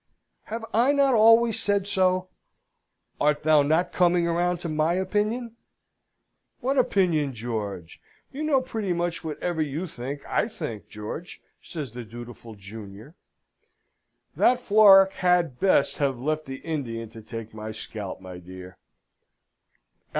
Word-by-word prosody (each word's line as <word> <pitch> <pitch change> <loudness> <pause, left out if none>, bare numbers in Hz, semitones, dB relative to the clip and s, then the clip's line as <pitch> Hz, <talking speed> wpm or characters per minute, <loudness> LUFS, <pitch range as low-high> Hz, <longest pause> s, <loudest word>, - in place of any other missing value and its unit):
"Have 225 +1 -5
I 240 +6 +4
not 280 -2 +3
always 225 0 +5
said 200 -1 +1
so? 185 -2 +1 0.9
Art 150 0 +1
thou 155 -1 +5
not 160 +5 +1
coming 175 -1 +3
round 175 +1 0
to 170 - -4
my 155 +2 +1
opinion?" 215 +5 -1 1.0
"What 270 +2 +1
opinion, 165 - +1
George? 105 -7 -5 0.3
You 275 - -6
know 300 -4 +2
pretty 220 -7 -3
much 170 -1 -2
whatever 160 +1 -3
you 155 +4 -2
think, 140 -2 -7
I - - 0
think, 150 - -7
George!" 105 +11 -7 0.2
says 150 -8 -7
the 120 +1 -7
dutiful 120 0 -10
junior. 100 +5 -11 1.2
"That 245 0 +4
Florac 200 -4 +7
had 180 -8 +1
best 185 -7 +2
have 140 -3 +1
left 155 +4 -2
the 135 - -5
Indian 120 -8 -4
to 115 - -11
take 115 0 -8
my 110 0 -6
scalp, 105 -2 -7
my 90 -1 -9
dear!" 90 +1 -11
160 Hz, 135 wpm, -25 LUFS, 115-195 Hz, 1.2 s, Florac